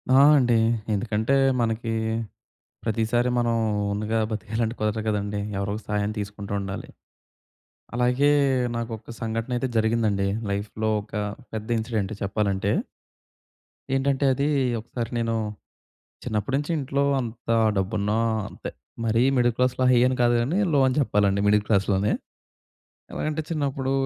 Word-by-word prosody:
ఆ! - - +7 0.2
అండి. 120 -3 +3 0.4
ఎందుకంటే, 110 +4 0 0.3
మనకీ 115 0 -1 0.9
ప్రతీసారి 115 +2 +1
మనం 120 -1 +2 0.4
ఓన్‌గా 110 +2 -1
బతికేయాలంటే 110 +2 -2
కుదరదు 110 +1 0
కదండీ. 105 -1 -1 0.2
ఎవరోళ్ళ 100 +2 -2
సహాయం 105 0 0
తీసుకుంటూ 100 0 -5
ఉండాలి. 100 0 -5 1.1
అలాగే, 125 +4 +3 0.4
నాకొక 115 -1 -5
సంఘటనయితే 115 +3 -2
జరిగిందండి. 110 -3 +2 0.2
లైఫ్‌లో 105 +2 -2
ఒక 105 +1 -11 0.4
పెద్ద 110 +1 -4
ఇన్సిడెంట్ 110 -2 -2
చెప్పాలంటే. 100 0 0 1.2
ఏంటంటే, 135 +1 +1
అదీ 140 +3 0 0.3
ఒకసారి 115 +1 -5
నేను 115 -1 0 0.9
చిన్నప్పుడు 110 +5 -2
నించి 145 +3 -2
ఇంట్లో 140 0 0 0.2
అంతా 115 -1 -3 0.2
డబ్బున్నా 105 +2 0 0.3
అంతే. - - -7 0.3
మరీ 115 +1 +2
మిడిల్ 120 -1 +3
క్లాస్‌లో 125 0 +1
హై 125 - +5
అని 130 0 +1
కాదు 120 0 +4
గానీ, 140 +11 0
లో 145 - +4
అని 130 - +1
చెప్పాలండి 100 -6 +2
మిడిల్ 105 0 +4
క్లాస్‌లోనే. 100 0 +2 1.0
ఎలగంటే, 155 +1 -2
చిన్నప్పుడూ 140 -4 -1
115 Hz, 115 wpm, -25 LUFS, 105-125 Hz, 1.2 s, ఆ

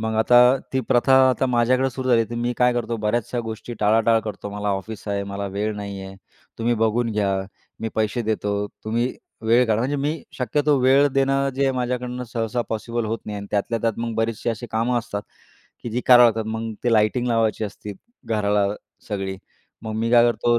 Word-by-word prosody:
मग 110 0 -2
आता 115 +2 +4 0.4
ती 130 - +1
प्रथा 130 +1 +3 0.2
आता 130 +1 0
माझ्याकडे 125 +2 +2
सुरू 130 +1 -4
झाली, 115 -2 +4
तर - - -4
मी 120 +1 -1
काय 125 0 +4
करतो 120 -1 -2
बऱ्याचशा 120 +3 0
गोष्टी 110 +2 -6
टाळाटाळ 110 +2 +3
करतो, 105 -2 -6
"मला 105 0 -3
ऑफिस 100 +2 -4
आहे, 100 0 -1
मला 100 0 -3
वेळ 105 +1 -1
नाही 100 -1 -6
आहे, 95 0 -9 0.4
तुम्ही 120 +1 +1
बघून 115 +1 +1
घ्या, 100 -2 +1 0.5
मी 115 - -2
पैसे 110 +2 0
देतो, 105 -2 -1 0.3
तुम्ही 115 +3 0 0.3
वेळ 115 +3 +4
काढा." 110 -1 +1
म्हणजे 135 +4 -1
मी 145 +2 -2 0.2
शक्यतो 145 +3 +1
वेळ 135 +3 +5
देणं 135 0 +2
जे 135 0 +2
माझ्याकडनं 125 0 -3
सहसा 115 +1 -1
पॉसिबल 115 +1 -3
होत 110 +1 -2
नाही 105 -1 -4
अन् 100 - -7
त्यातल्या 105 +3 0
त्यात 115 -1 -1
मग 115 -1 -3
बरेचसे 115 +1 -1
असे 115 +2 -5
कामं 115 +2 +1
असतात, 105 -3 -5 0.6
की 120 - -5
जी 120 +3 -1
करावं 125 -1 +8
लागतात 110 -1 0
मग 115 0 -4
ते 120 - +2
लाइटिंग 110 +3 +2
लावायची 115 -2 +1
असते 105 0 -7 0.3
घराला 105 -2 +1 0.4
सगळी. 95 -2 -3 0.5
मग 110 -1 -5
मी 115 +1 0
काय 120 -1 +6
करतो 120 0 +1
115 Hz, 190 wpm, -22 LUFS, 105-125 Hz, 0.6 s, करावं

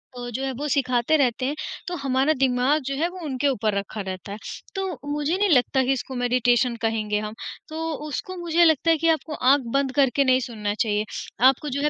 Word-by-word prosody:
तो 245 0 -6
जो 260 +4 -3
है 270 - -1
वो 295 - -2
सिखाते 255 +1 +2
रहते 255 -2 +1
हैं, 285 +3 -1 0.3
तो 355 - -3
हमारा 270 +2 +2
दिमाग 265 +3 +2
जो 275 +1 -2
है 315 +5 +1
वो 370 +1 -10
उनके 275 -1 -1
ऊपर 220 -6 0
रखा 200 +2 -4
रहता 190 0 -6
है। 205 - -5 0.4
तो 385 0 -1 0.3
मुझे 295 +4 0
नहीं 410 0 +2
लगता 265 -3 +3
कि 260 - +1
इसको 265 0 -5
मेडिटेशन 245 -1 +2
कहेंगे 215 -2 0
हम। 210 0 -5 0.4
तो 315 +1 -6 0.3
उसको 370 +6 -5
मुझे 345 -1 +2
लगता 320 0 +3
है 325 - +3
कि 330 +2 0
आपको 320 -1 0
आँख 275 0 +3
बंद 275 -1 +1
करके 280 -1 +3
नहीं 260 -1 +4
सुनना 215 -5 -3
चाहिए। 210 -1 0 0.4
आपको 270 +3 +2
जो 280 +1 -2
है 300 - +2
265 Hz, 215 wpm, -24 LUFS, 240-295 Hz, 0.4 s, नहीं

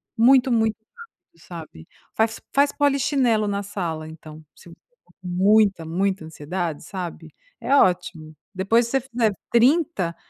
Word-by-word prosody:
muito, 255 +2 +4
muito 220 -2 +2 0.2
rápido, 460 - -18
sabe? 160 - -11 0.3
Faz 225 0 0
faz 280 +1 +3
polichinelo 270 -6 +1
na 200 0 -2
sala 170 -6 -5
então, 155 0 -12
você - - -16
com - - -22
muita 195 0 +3
muita 185 +1 -1
ansiedade, 160 +1 -5
sabe? 175 -4 -7 0.3
É 275 - +1
ótimo. 175 - +1 0.2
Depois 225 +5 +2
que 235 - -7
você 270 - +1
fizer 235 -4 -1 0.2
30, 245 - +2
200 Hz, 135 wpm, -23 LUFS, 170-240 Hz, 0.3 s, muito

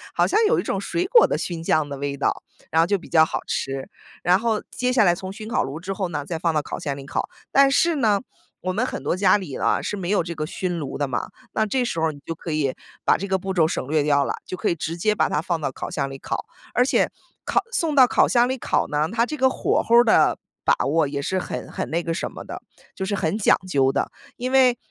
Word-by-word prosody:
好 - - +4
像 430 - +2
有 470 - +3
一 - - -1
种 - - -2
水 355 +2 -1
果 470 +4 +6
的 - - -1
熏 170 -2 -4
酱 155 -2 +1
的 140 -1 -6
味 140 0 -3
道， - - 0 0.3
然 160 +1 +4
后 165 - +2
就 200 0 +2
比 180 - -13
较 160 -1 +6
好 - - -2
吃。 135 0 -3 0.4
然 180 +2 +4
后 225 -1 0
接 250 0 -1
下 250 -3 +4
来 175 -3 +5
从 185 +2 -6
熏 215 +1 -8
烤 - - +1
炉 135 +4 -4
之 190 +3 -4
后 190 -2 -2
呢， 150 -3 -4
再 165 +1 -4
放 165 +1 +1
到 150 - +1
烤 - - -6
箱 140 -2 -3
里 135 - -9
烤。 - - -3 0.2
但 275 0 +6
是 325 +4 +3
呢， 215 -7 +2 0.4
我 185 - -1
们 225 +7 0
很 - - -5
多 180 - 0
家 200 +1 +5
里 170 -9 -6
啊， 115 -2 +1
是 205 - -3
没 180 -1 -4
有 200 -4 +2
这 170 0 -5
个 155 -1 -3
熏 175 +1 -3
炉 145 - -5
的 145 - 0
嘛， 125 -3 -3 0.2
那 220 - +1
这 250 +4 0
时 170 -9 -2
候 160 -1 +1
你 145 - -14
就 165 - -3
可 165 +1 -7
以 140 -4 0 0.3
把 - - +4
这 195 - -4
个 190 -1 +1
步 190 +1 -4
骤 165 -4 +3
省 130 - -3
略 155 0 +2
掉 145 -1 +3
了， - - -2
就 185 - -5
可 - - -1
以 - - +1
直 160 +2 -4
接 210 +5 +1
把 - - +2
它 - - 0
放 170 -1 -1
到 145 - -1
烤 - - -5
箱 140 -2 -2
里 135 - -7
烤。 - - -4 0.3
而 250 +1 +3
且， - - +2 0.3
烤 - - +2
送 325 -7 +1
到 255 -2 +8
烤 - - +3
箱 240 0 +4
里 260 +1 -2
烤 - - 0
呢， 150 +2 0
它 230 0 +2
这 305 +5 -5
个 260 -2 +3
火 - - +1
候 235 +1 +4
儿 240 - +8
的 225 - +4 0.3
把 - - +5
握 150 +1 +2
也 140 0 -3
是 185 +6 -1
很 - - -5
很 - - -4
那 170 +2 0
个 165 - -2
什 165 - -3
么 - - -9
的， - - -7 0.3
就 190 - -3
是 205 - -2
很 190 +1 -1
讲 210 - +4
究 135 -6 +2
的。 - - -1 0.3
因 250 +1 -3
为， 255 -2 +5
180 Hz, 300 characters per minute, -23 LUFS, 150-220 Hz, 0.4 s, 到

